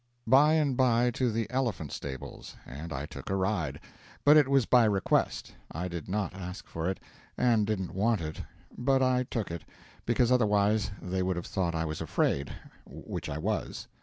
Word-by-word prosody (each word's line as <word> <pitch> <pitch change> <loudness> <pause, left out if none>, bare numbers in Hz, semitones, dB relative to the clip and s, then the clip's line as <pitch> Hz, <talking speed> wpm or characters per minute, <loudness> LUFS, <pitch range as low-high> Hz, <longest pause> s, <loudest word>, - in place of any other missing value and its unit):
By 140 +6 +6
and 150 -5 +2
by 120 -1 +3
to 125 0 0
the 115 0 -1
elephant 120 - -1
stables, 65 -2 -7
and 75 +5 -8
I 70 -1 -3
took 80 - -9
a 95 - 0
ride; 95 -8 -1 0.5
but 145 +1 +8
it 150 -3 +6
was 135 -3 +3
by 125 0 +5
request 100 -3 +1 0.2
I 90 +3 -3
did 85 -1 -6
not 100 -1 -1
ask 90 -1 -7
for 85 +2 -3
it, 95 - -3 0.4
and 115 -4 +3
didn't 95 -4 -2
want 105 +3 +2
it; 80 -1 -5 0.3
but 135 +1 +2
I 125 -1 +2
took 110 -7 -3
it, 85 -2 -5 0.4
because 120 +1 +3
otherwise 105 -3 +3
they 95 0 -2
would 95 0 0
have 85 - -4
thought 85 -3 -1
I 80 0 0
was 80 -1 -4
afraid, 70 -2 0 0.4
which - - -6
I 70 - -3
was. 75 - -3
105 Hz, 185 wpm, -29 LUFS, 85-125 Hz, 0.5 s, but